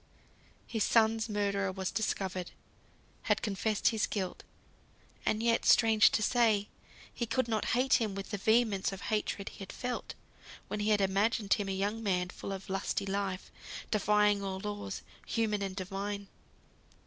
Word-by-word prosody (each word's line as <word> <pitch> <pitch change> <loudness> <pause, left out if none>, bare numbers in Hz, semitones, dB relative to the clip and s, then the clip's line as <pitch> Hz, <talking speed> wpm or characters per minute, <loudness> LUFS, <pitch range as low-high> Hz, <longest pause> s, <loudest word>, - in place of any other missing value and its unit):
His 220 -3 -1
son's 225 0 +3
murderer 200 -2 0
was 190 0 -3
discovered; 190 -4 -2 0.8
had - - +2
confessed 210 0 +1
his 220 -2 0
guilt; 190 -3 -3 0.9
and 215 +1 +1
yet 230 0 +3
(strange 220 -2 +6
to 215 - +2
say) 220 -3 +3 0.4
he 235 - -3
could 235 +2 0
not 220 -2 0
hate 260 0 +4
him 210 -3 -1
with 195 0 -6
the 205 - -2
vehemence 220 -2 +2
of 195 0 -7
hatred 210 -2 -1
he - - -14
had 195 -1 -7
felt, 250 0 -4 0.5
when - - -3
he 210 +1 0
had 210 -1 +3
imagined 200 +2 +2
him 200 -2 -1
a - - 0
young 200 +4 -1
man, 180 -4 0
full 195 - -7
of 195 0 -6
lusty 195 0 -1
life, 195 -1 -3 0.4
defying 210 -1 +3
all 190 -1 -3
laws, 205 -1 -5 0.2
human 215 -3 0
and 195 -1 -3
divine. 200 +1 -4
205 Hz, 160 wpm, -32 LUFS, 195-220 Hz, 0.9 s, strange